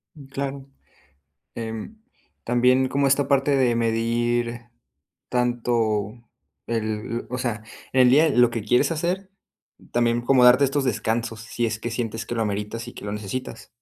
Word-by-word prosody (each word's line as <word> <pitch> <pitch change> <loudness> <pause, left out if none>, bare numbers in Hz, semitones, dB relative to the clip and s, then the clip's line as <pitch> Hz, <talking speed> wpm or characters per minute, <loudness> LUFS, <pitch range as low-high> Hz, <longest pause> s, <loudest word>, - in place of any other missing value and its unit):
Mm, 145 -3 -12
claro, 135 0 -5 0.9
em, 115 - -6 0.4
también 125 +2 +3
como 140 +1 +1
esta 140 +1 +2
parte 140 0 +2
de 125 -3 +2
medir 115 +1 0 0.7
tanto 120 -4 0 0.5
el 110 0 -3
o 125 - -3
sea, 115 -4 -3 0.3
en 130 - +5
el 125 - +6
día 155 +5 +5
lo 125 -3 +4
que 115 -2 -3
quieres 125 +8 +2
hacer, 180 +4 -2 0.6
también 120 0 +1
como 125 +1 +4
darte 125 +3 +7
estos 140 +1 0
descansos, 115 -1 -1
si 120 0 -2
es 110 -1 -2
que 120 - -4
sientes 115 -2 -3
que 120 - -4
lo 115 - 0
ameritas 105 +2 -4
y - - -9
que - - -9
lo 100 - -4
necesitas. 105 +3 -6
120 Hz, 155 wpm, -24 LUFS, 115-130 Hz, 0.9 s, darte